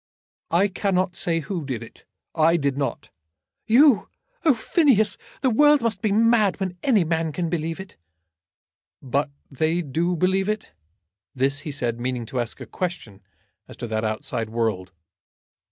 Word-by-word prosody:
"I 180 Hz, +5 st, +3 dB
cannot 185 Hz, -2 st, 0 dB
say 165 Hz, -1 st, 0 dB
who 170 Hz, +1 st, -4 dB
did 130 Hz, -5 st, -4 dB
it. 115 Hz, -, -15 dB, 0.3 s
I 165 Hz, +1 st, +4 dB
did 140 Hz, -3 st, 0 dB
not." 140 Hz, -1 st, -3 dB, 0.6 s
"You! 255 Hz, +1 st, +5 dB, 0.3 s
Oh, 310 Hz, -6 st, +5 dB
Phineas! 220 Hz, -, +2 dB, 0.3 s
The 260 Hz, -2 st, +2 dB
world 295 Hz, +5 st, +5 dB
must 225 Hz, -4 st, -1 dB
be 215 Hz, -, +1 dB
mad 220 Hz, -3 st, +3 dB
when 185 Hz, -2 st, -3 dB
any 220 Hz, -10 st, +3 dB
can 165 Hz, +1 st, -1 dB
believe 165 Hz, 0 st, -2 dB
it!" 190 Hz, -, -10 dB, 1.0 s
"But 140 Hz, +3 st, -1 dB, 0.2 s
they 160 Hz, +5 st, 0 dB
do 165 Hz, +5 st, -1 dB
believe 190 Hz, +3 st, +1 dB
it?" 215 Hz, +1 st, -3 dB, 0.6 s
This, 135 Hz, +2 st, +1 dB
he 150 Hz, +1 st, -6 dB
said, 120 Hz, -4 st, -2 dB
meaning 125 Hz, -1 st, -2 dB
to 125 Hz, +3 st, -4 dB
ask 120 Hz, -1 st, -3 dB
a -, -, -7 dB
question 170 Hz, -, -5 dB, 0.5 s
as -, -, -12 dB
to -, -, -5 dB
that 110 Hz, 0 st, -1 dB
outside 110 Hz, 0 st, -3 dB
world. 110 Hz, -5 st, -2 dB
170 Hz, 155 wpm, -24 LUFS, 135-205 Hz, 1.0 s, You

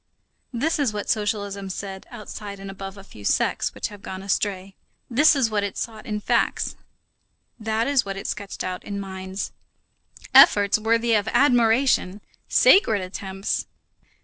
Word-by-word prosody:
This 300 Hz, +7 st, -1 dB
is 275 Hz, -6 st, +2 dB
what 205 Hz, -1 st, -2 dB
socialism 200 Hz, -2 st, -2 dB
said 190 Hz, 0 st, -6 dB
outside 210 Hz, -3 st, -8 dB
and 195 Hz, 0 st, -7 dB
above 195 Hz, 0 st, -8 dB
a 195 Hz, -, -11 dB
few 105 Hz, -, -14 dB
sects -, -, 0 dB
which -, -, -3 dB
have 205 Hz, -1 st, -12 dB
gone 190 Hz, -1 st, -7 dB
astray; 195 Hz, -1 st, -2 dB, 0.4 s
that 295 Hz, +6 st, +5 dB
is 250 Hz, -5 st, +1 dB
what 205 Hz, -1 st, 0 dB
it 200 Hz, -, -4 dB
sought 220 Hz, -2 st, -5 dB
in 210 Hz, -1 st, -2 dB
facts, -, -, 0 dB, 0.8 s
that 220 Hz, +1 st, 0 dB
is 280 Hz, -3 st, +3 dB
what 195 Hz, -1 st, -5 dB
it 195 Hz, -, -7 dB
sketched 200 Hz, -2 st, -5 dB
out 185 Hz, 0 st, -4 dB
in 200 Hz, -1 st, -5 dB
minds. 190 Hz, 0 st, -5 dB, 0.8 s
Efforts 205 Hz, +1 st, +7 dB
worthy 230 Hz, +1 st, +2 dB
of 210 Hz, -1 st, +2 dB
admiration! 240 Hz, -6 st, +3 dB, 0.3 s
Sacred 295 Hz, -, +5 dB
attempts! 190 Hz, +1 st, -4 dB
205 Hz, 150 wpm, -24 LUFS, 195-225 Hz, 0.8 s, Efforts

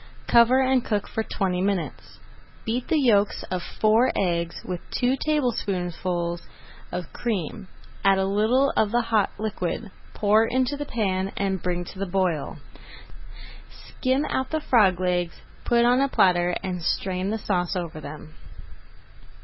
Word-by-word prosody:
Cover 235 Hz, +2 st, +5 dB
and 260 Hz, -1 st, +2 dB
cook 210 Hz, -2 st, -1 dB
for 225 Hz, -, -2 dB
twenty 190 Hz, -4 st, -1 dB
minutes. 190 Hz, -4 st, -3 dB, 0.5 s
Beat 240 Hz, +3 st, -2 dB
the 325 Hz, -, +2 dB
yolks 210 Hz, -7 st, +2 dB
of 185 Hz, -1 st, -1 dB
four 220 Hz, +7 st, +2 dB
eggs 170 Hz, -3 st, -1 dB
with 180 Hz, -1 st, -4 dB
[Page -, -, -7 dB
155] 255 Hz, +1 st, +1 dB
two 310 Hz, -, 0 dB
tablespoonfuls 180 Hz, -, -1 dB, 0.5 s
of 180 Hz, -1 st, -5 dB
cream, 205 Hz, -3 st, -3 dB, 0.4 s
add 195 Hz, -1 st, +5 dB
a 190 Hz, -, +1 dB
little 220 Hz, +8 st, +2 dB
of 215 Hz, -, +2 dB
the 240 Hz, +3 st, +2 dB
hot 225 Hz, -3 st, +1 dB
liquid, 210 Hz, -1 st, -3 dB, 0.2 s
pour 215 Hz, +1 st, +4 dB
into 260 Hz, +3 st, 0 dB
the 290 Hz, 0 st, -5 dB
pan, 195 Hz, -4 st, -1 dB
and 195 Hz, -2 st, -1 dB
bring 175 Hz, -1 st, -2 dB
to 190 Hz, -, -10 dB
the 195 Hz, -, -2 dB
boil. 180 Hz, -5 st, -1 dB, 1.1 s
Skim 260 Hz, +3 st, -2 dB
out 260 Hz, 0 st, -2 dB
the 315 Hz, -, -1 dB
frog 205 Hz, -, +3 dB
legs, 180 Hz, -2 st, -1 dB, 0.2 s
put 235 Hz, 0 st, +3 dB
on 250 Hz, +2 st, +4 dB
a 275 Hz, -, +3 dB
platter, 180 Hz, -7 st, +3 dB
and 180 Hz, -2 st, -3 dB
strain 185 Hz, +2 st, -1 dB
the 220 Hz, -, -1 dB
sauce 185 Hz, -3 st, -1 dB
over 170 Hz, -3 st, -4 dB
them. 155 Hz, +1 st, -9 dB
200 Hz, 155 wpm, -25 LUFS, 180-235 Hz, 1.1 s, Cover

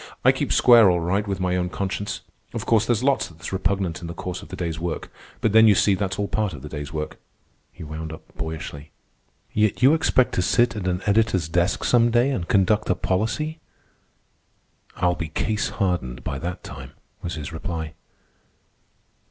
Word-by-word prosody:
I -, -, +8 dB
keep -, -, -2 dB
square 115 Hz, -5 st, +7 dB
all 90 Hz, -1 st, +2 dB
right 95 Hz, +5 st, 0 dB
with 100 Hz, -1 st, -2 dB
my 90 Hz, 0 st, 0 dB
own 90 Hz, -1 st, 0 dB
conscience. 100 Hz, +2 st, -3 dB, 0.3 s
Of -, -, -3 dB
course, 110 Hz, -1 st, +3 dB
there's 120 Hz, 0 st, +1 dB
lots 140 Hz, 0 st, +2 dB
that's 85 Hz, +3 st, -9 dB
repugnant 95 Hz, -2 st, -1 dB
in 85 Hz, -, -6 dB
the 85 Hz, -, -6 dB
course 90 Hz, 0 st, -5 dB
of 100 Hz, -, -11 dB
the -, -, -6 dB
day's 85 Hz, -3 st, -3 dB
work. 85 Hz, -1 st, -4 dB, 0.3 s
But 110 Hz, -, +2 dB
then, 110 Hz, +1 st, +7 dB
you 105 Hz, -, +6 dB
see, 100 Hz, -, +4 dB
that's 95 Hz, 0 st, -2 dB
all 100 Hz, -, -1 dB
part 105 Hz, -4 st, -1 dB
of 65 Hz, -, -9 dB
the -, -, -7 dB
day's 75 Hz, 0 st, -6 dB
work," 75 Hz, 0 st, -5 dB, 0.5 s
he 85 Hz, -, -11 dB
wound 80 Hz, +1 st, -6 dB
up 80 Hz, -, -9 dB
boyishly. 75 Hz, -2 st, -6 dB, 0.6 s
"Yet 105 Hz, +3 st, +1 dB
you 135 Hz, +4 st, +7 dB
expect 130 Hz, -5 st, +2 dB
to -, -, +1 dB
sit 120 Hz, +6 st, +2 dB
at 100 Hz, -4 st, -3 dB
an 90 Hz, +1 st, -1 dB
editor's 100 Hz, -5 st, +2 dB
desk 85 Hz, +3 st, 0 dB
some 120 Hz, -1 st, +4 dB
day 120 Hz, +4 st, +3 dB
and 90 Hz, -10 st, -2 dB
conduct 105 Hz, +2 st, +2 dB
a 95 Hz, -, +3 dB
policy." 135 Hz, -, -1 dB, 1.4 s
"I'll 90 Hz, -1 st, +2 dB
be 85 Hz, -2 st, -4 dB
case 105 Hz, +6 st, -1 dB
hardened 90 Hz, -, -2 dB
by 70 Hz, -, -3 dB
that 90 Hz, +3 st, -5 dB
time," -, -, -9 dB, 0.3 s
was 85 Hz, -, -4 dB
his 80 Hz, +1 st, -6 dB
reply. 80 Hz, -1 st, -4 dB
95 Hz, 195 wpm, -24 LUFS, 85-110 Hz, 1.4 s, I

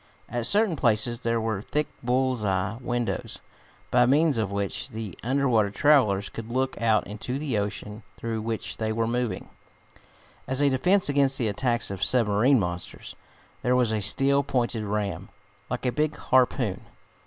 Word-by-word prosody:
At 120 Hz, 0 st, 0 dB
certain 205 Hz, -4 st, +5 dB
places 120 Hz, -3 st, +1 dB
there 115 Hz, -1 st, 0 dB
were 110 Hz, -3 st, -2 dB
thick 150 Hz, +7 st, -1 dB, 0.2 s
bull's 125 Hz, -1 st, 0 dB
eye 95 Hz, +2 st, -1 dB
windows, 120 Hz, -1 st, -3 dB, 0.5 s
by 125 Hz, 0 st, +4 dB
means 145 Hz, -1 st, +3 dB
of 105 Hz, -3 st, -1 dB
which 100 Hz, -1 st, -2 dB
the 110 Hz, -5 st, -6 dB
under 135 Hz, +3 st, 0 dB
water 110 Hz, -5 st, +3 dB
travelers 105 Hz, -6 st, +3 dB
could 115 Hz, 0 st, -8 dB
look 130 Hz, +1 st, -1 dB
out 110 Hz, -2 st, +2 dB
into 110 Hz, +5 st, -5 dB
the 140 Hz, -7 st, -1 dB
ocean 105 Hz, +1 st, -5 dB, 0.2 s
through 115 Hz, -1 st, -3 dB
which 110 Hz, 0 st, -4 dB
they 110 Hz, -1 st, -2 dB
were 115 Hz, +1 st, 0 dB
moving. 120 Hz, -4 st, -2 dB, 1.0 s
As 130 Hz, +1 st, 0 dB
a 145 Hz, -1 st, +3 dB
defense 180 Hz, +9 st, +2 dB
against 140 Hz, -2 st, +2 dB
the 115 Hz, -3 st, 0 dB
attacks 120 Hz, +1 st, -1 dB
of 95 Hz, -2 st, -3 dB
submarine 120 Hz, +2 st, +3 dB
monsters 85 Hz, -2 st, -5 dB, 0.5 s
there 125 Hz, +1 st, +2 dB
was 125 Hz, -3 st, +2 dB
a 110 Hz, -1 st, -1 dB
steel, 135 Hz, +7 st, +2 dB
pointed 120 Hz, -5 st, -1 dB
ram, 105 Hz, -1 st, -3 dB, 0.4 s
like -, -, -4 dB
a 125 Hz, -, +2 dB
big 150 Hz, +4 st, -1 dB
harpoon. 125 Hz, -6 st, +1 dB
120 Hz, 165 wpm, -26 LUFS, 105-130 Hz, 1.0 s, certain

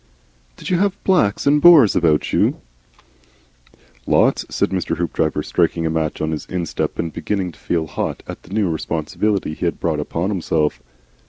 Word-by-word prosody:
"Did -, -, -6 dB
you 175 Hz, -, +2 dB
have 200 Hz, 0 st, +1 dB
Blacks 145 Hz, -, +2 dB
and 145 Hz, +1 st, +4 dB
Boers 155 Hz, -, +7 dB
about 80 Hz, -3 st, +2 dB
you?" -, -, +2 dB, 1.5 s
"Lots," -, -, +2 dB
said -, -, -1 dB
Mr. 95 Hz, -2 st, -2 dB
Hoopdriver, 80 Hz, -2 st, -1 dB
striking 85 Hz, -1 st, 0 dB
a 80 Hz, -, 0 dB
match 80 Hz, -1 st, -2 dB
on 80 Hz, -, -1 dB
his 80 Hz, -, -5 dB
instep 90 Hz, -3 st, -3 dB
and 85 Hz, -1 st, -3 dB
beginning 95 Hz, -4 st, -2 dB
to -, -, -21 dB
feel 80 Hz, -2 st, -1 dB
hot 75 Hz, -, -4 dB
at -, -, -8 dB
the -, -, -17 dB
new 105 Hz, -1 st, +1 dB
responsibility 80 Hz, +3 st, -2 dB
he 85 Hz, -, -4 dB
had 85 Hz, -, -2 dB
brought 80 Hz, -3 st, -1 dB
upon 85 Hz, +6 st, -2 dB
himself. 80 Hz, -5 st, -1 dB
85 Hz, 170 wpm, -20 LUFS, 80-105 Hz, 1.5 s, Boers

